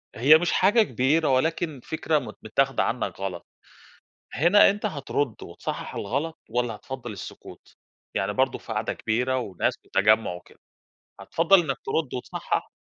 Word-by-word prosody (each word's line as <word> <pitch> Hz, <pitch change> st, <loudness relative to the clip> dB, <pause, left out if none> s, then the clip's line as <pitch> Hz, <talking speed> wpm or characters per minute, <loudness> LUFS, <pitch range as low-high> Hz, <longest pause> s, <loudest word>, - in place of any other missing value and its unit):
هي 140 Hz, +8 st, +7 dB
مش 175 Hz, +2 st, 0 dB
حاجة 205 Hz, +5 st, +4 dB
كبيرة 150 Hz, -, +1 dB
ولكن 155 Hz, +2 st, 0 dB
فكرة 160 Hz, -1 st, 0 dB
مت 130 Hz, -, -9 dB
متاخده 135 Hz, +5 st, +1 dB
عنك 120 Hz, -4 st, -2 dB
غلط، 95 Hz, -3 st, -5 dB, 0.9 s
هنا 175 Hz, +8 st, +6 dB
أنت 205 Hz, +2 st, -3 dB
هترد 140 Hz, -, -3 dB
وتصحح -, -, -6 dB
الغلط 145 Hz, +10 st, -3 dB
والّا 120 Hz, 0 st, -1 dB
هتفضّل 125 Hz, 0 st, -7 dB
السكوت، 100 Hz, -, -11 dB, 0.4 s
يعني 95 Hz, +1 st, 0 dB
برضه 130 Hz, +2 st, +1 dB
في -, -, -8 dB
قعدة -, -, -1 dB
كبيرة 125 Hz, +4 st, -1 dB
وناس 100 Hz, -8 st, -1 dB
وتجمّع 110 Hz, -2 st, +2 dB
وكده، 90 Hz, -, -14 dB, 0.6 s
هتفضّل 170 Hz, +4 st, +4 dB
إنك 140 Hz, -6 st, -2 dB
ترد 145 Hz, 0 st, -1 dB
وتصحح؟ 125 Hz, -, -3 dB
135 Hz, 140 wpm, -25 LUFS, 115-160 Hz, 0.9 s, هي